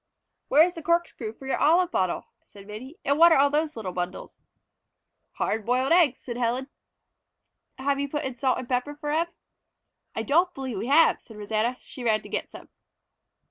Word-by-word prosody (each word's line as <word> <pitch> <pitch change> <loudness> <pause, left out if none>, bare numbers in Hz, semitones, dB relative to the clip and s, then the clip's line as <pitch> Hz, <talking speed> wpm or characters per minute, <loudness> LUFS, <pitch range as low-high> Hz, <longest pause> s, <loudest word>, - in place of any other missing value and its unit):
"Where 300 +4 +6
is 355 - -3
the 330 - -8
corkscrew 340 -9 -1
for 265 - -13
your 270 - -1
olive 345 +4 +4
bottle?" 185 - -1 0.2
said 200 -1 -14
Minnie. 225 +9 -9
"And 280 +2 +1
what 340 +1 +8
are 320 - +6
all 280 +1 +4
those 305 +1 0
little 210 -5 -5
bundles?" 180 0 -5 0.9
"Hard 220 0 -1
boiled 255 +5 +1
eggs," 330 -7 +4
said 240 -2 -6
Helen. 250 +3 -1 1.1
"Have 275 +1 0
you 280 0 -2
put 295 +2 -3
in 265 - -3
salt 255 +1 +1
and 250 - -6
pepper 255 +4 -1
for 295 0 -4
'em?" 325 +3 +1 0.9
"I 220 - -2
don't 335 - +3
believe 260 -7 -4
we 220 - -4
have," 310 +5 +4
said 220 - -14
Rosanna. 220 +4 -1
She 255 - -10
ran 215 -2 +1
to - - -11
get - - -3
some. - - -13
265 Hz, 190 wpm, -26 LUFS, 225-300 Hz, 1.1 s, what